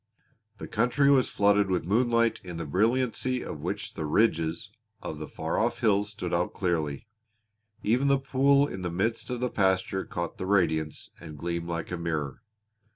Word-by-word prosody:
The - - -7
country 140 +3 +3
was 130 -3 +4
flooded 100 -1 +3
with 90 -3 0
moonlight 115 +3 +2
in 90 -2 -7
the 85 - -4
brilliancy 125 - +1
of - - -6
which - - -4
the - - -4
ridges 85 +2 +1 0.3
of 75 - -6
the 75 - -5
far 80 +1 -3
off 115 +2 0
hills 105 -2 +3
stood 90 -4 -4
out 85 +1 0
clearly; 80 -4 -1 0.8
even 125 +6 +2
the 140 0 +4
pool 140 +1 +3
in 95 - -6
the 90 - -2
midst 100 +7 -1
of 125 -1 -3
the 125 - -1
pasture 95 -1 +1
caught 85 -1 -5
the 95 - -3
radiance 80 -6 0
and 80 -3 -10
gleamed 85 +2 -3
like 85 0 -4
a 90 - -2
mirror. 80 -4 -3
95 Hz, 175 wpm, -28 LUFS, 85-120 Hz, 0.8 s, was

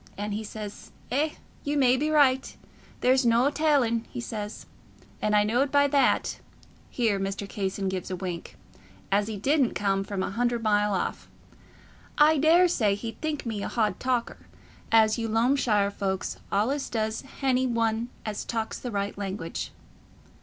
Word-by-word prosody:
And 205 +1 -3
he 215 +2 -3
says, 210 -1 -8 0.2
'Eh, 300 +4 +1 0.3
ye 290 +1 -1
may 260 -3 +4
be 300 +4 0
raight, 275 -4 +3 0.4
there's 260 +1 +4
noo 240 +4 +3
tallin',' 275 -7 +2
he - - -6
says, 215 -2 -5 0.6
and 210 0 +2
I 205 - +5
knowed 245 +6 +1
by 285 0 +4
that"—here 245 -5 -1
Mr. 195 +1 -3
Casson 195 -1 -3
gave 185 -1 -3
a 185 - -2
wink—"as 185 +3 -5
he 220 -2 -4
didn't 270 +4 +2
come 195 -1 +1
from 195 -1 -3
a - - -3
hundred 240 +2 0
mile 210 -1 +2
off. 180 - -3 0.9
I 300 0 +5
daresay 315 - +4
he'd 225 +2 -7
think 310 -3 -2
me 220 -3 -3
a - - -3
hodd 215 -3 0
talker, 250 -2 -2 0.4
as 220 0 +5
you 225 -1 -2
Loamshire 225 -3 +2
folks 190 -2 -3
allays 255 +8 0
does 220 -1 -2
hany 260 -1 0
one 230 0 0 0.2
as 215 -2 -3
talks 225 -1 -3
the 250 - -5
right 200 -2 -2
language." 190 -4 -4
225 Hz, 155 wpm, -27 LUFS, 205-260 Hz, 0.9 s, I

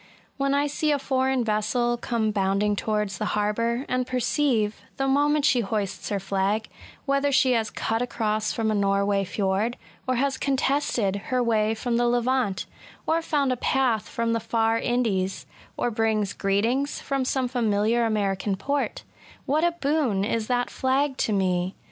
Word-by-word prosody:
When 275 0 +1
I 285 +1 +2
see 295 +2 -1
a 290 - +3
foreign 265 -2 0
vessel 225 +3 0
come 230 -2 -1
boundi 195 0 +1
ing 210 0 +1
towards 210 -3 -2
the 215 - -1
harbour, 230 +5 0
and 255 0 -1
perceive, 250 -4 0 0.2
the 270 - 0
moment 290 +2 +3
she 270 -4 +4
hoists 205 -2 -2
her 205 -2 -1
flag, 195 +3 -1 0.4
whether 275 0 +1
she 265 -1 +4
has 225 -3 +1
cut 225 +1 -2
across 215 -3 -1
from 220 -1 0
a - - +1
Norway 200 0 +1
flord, 200 +4 -1 0.3
or 255 - +1
has 270 +1 0
contested 270 -7 0
her 255 -1 +1
way 220 -1 +1
from 235 +1 -1
the 240 0 +2
Levant, 245 -4 +1 0.4
or 325 +1 +1
found 285 -4 0
a 255 - -1
path 250 -4 +1
from 230 0 -1
the 230 - +1
far 225 0 +1
Indies, 215 -7 -1 0.3
or 240 - 0
brings 215 -2 0
greetings 230 +8 0
from 275 -1 -1
some 260 0 0
familiar 230 -1 +1
American 205 -3 0
port,— 280 +9 -2 0.4
what 300 +3 +1
a 345 0 +3
boon 280 - 0
is 220 0 -1
that 245 0 0
flag 265 +1 +1
to - - 0
me 185 -2 0
230 Hz, 165 wpm, -25 LUFS, 210-265 Hz, 0.4 s, she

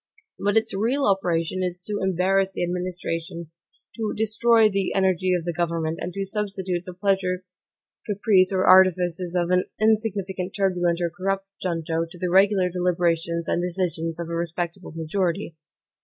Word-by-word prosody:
But 205 +2 +2
its 225 0 +1
real 240 +8 +1
operation 180 -2 0
is 180 -1 -3
to 205 +1 -3
embarrass 190 +1 +1
the - - -2
administration, 170 -2 -4 0.5
to 220 -2 -2
destroy 220 +1 +4
the 195 -2 -1
energy 185 -1 +2
of 170 -2 -3
the 175 - -2
government, 165 -1 -1
and 180 - -3
to 195 0 -3
substitute 190 -3 -3
the 180 - -7
pleasure, 185 -1 0 0.6
caprice, 200 -3 +3
or 190 -1 +1
artifices 180 -1 +4
of 175 0 +1
an 180 0 +3
insignificant, 205 -4 0
turbulent, 180 -3 +1
or 170 -1 0
corrupt 195 +2 -2 0.2
junto, 165 -2 -2
to 175 - -12
the 180 0 -2
regular 190 0 +4
deliberations 170 -2 0
and 175 - 0
decisions 170 -2 -2
of 170 - -4
a 170 - -5
respectable 170 +2 -4
majority. 165 +1 -2
180 Hz, 155 wpm, -24 LUFS, 170-195 Hz, 0.6 s, destroy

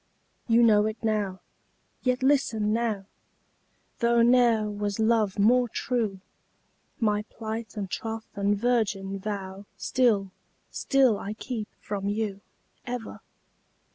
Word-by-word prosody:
You 235 0 +5
know 210 -2 +5
it 220 +1 -4
now 205 -4 -1 0.6
yet 255 0 0
listen 225 -6 +2
now 220 -4 -1 0.9
Though 235 -1 +4
ne'er 235 -3 +4
was 205 -1 -3
love 220 -3 +2
more 240 +4 +4
true, 215 -6 -2 0.8
My 210 -3 +2
plight 225 0 -6
and 200 -2 -2
troth 225 +3 -4
and 200 0 +1
virgin 200 -4 0
vow 195 -1 -5
Still, 215 -7 +1 0.4
still 265 -6 +3
I 205 - -4
keep 220 -1 -5
from 200 -1 -3
you, 205 -2 -2 0.5
Ever! 245 -2 -5
220 Hz, 115 wpm, -27 LUFS, 205-235 Hz, 0.9 s, You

